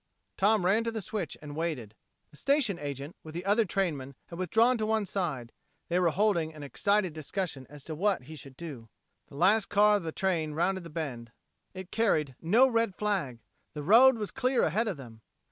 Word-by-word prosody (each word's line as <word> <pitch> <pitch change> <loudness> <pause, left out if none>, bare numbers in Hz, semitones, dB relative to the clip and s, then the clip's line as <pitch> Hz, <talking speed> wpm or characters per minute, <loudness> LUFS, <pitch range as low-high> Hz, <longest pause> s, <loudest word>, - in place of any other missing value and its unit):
Tom 205 -1 +3
ran 210 +5 +3
to 230 - -2
the 225 - -4
switch 190 -4 -4
and 145 -1 -8
waited. 150 -10 -3 0.4
The 150 - -14
station 265 - +1
agent, 140 +2 -6
with 155 0 -11
the 175 +2 -5
other 210 +3 +3
trainmen, 150 -9 -2
had 170 - -8
withdrawn 225 +8 +3
to 215 - 0
one 220 -1 +1
side; 150 - -3 0.4
they 175 +1 +2
were 175 -2 +3
holding 170 -4 +1
an 150 - -9
excited 190 - +1
discussion 155 -3 -4
as 145 -1 -12
to 160 - -6
what 195 0 0
he 155 +5 -10
should 135 -2 -12
do. 135 -10 -8 0.4
The - - -14
last 195 +7 +4
car 210 +1 +5
of - - -5
the 160 - -3
train 165 -4 -1
rounded 185 +3 0
the - - -8
bend. 130 -8 -5 0.4
It 185 -1 -8
carried 155 - +1
no 225 +11 +5
red 230 -5 0
flag! 180 - -2 0.3
The 150 - -5
road 235 - +7
was 210 -2 -4
clear 260 -1 +1
ahead 215 +9 +1
of 195 -7 -2
them! 115 -5 -12
175 Hz, 200 wpm, -29 LUFS, 150-210 Hz, 0.4 s, road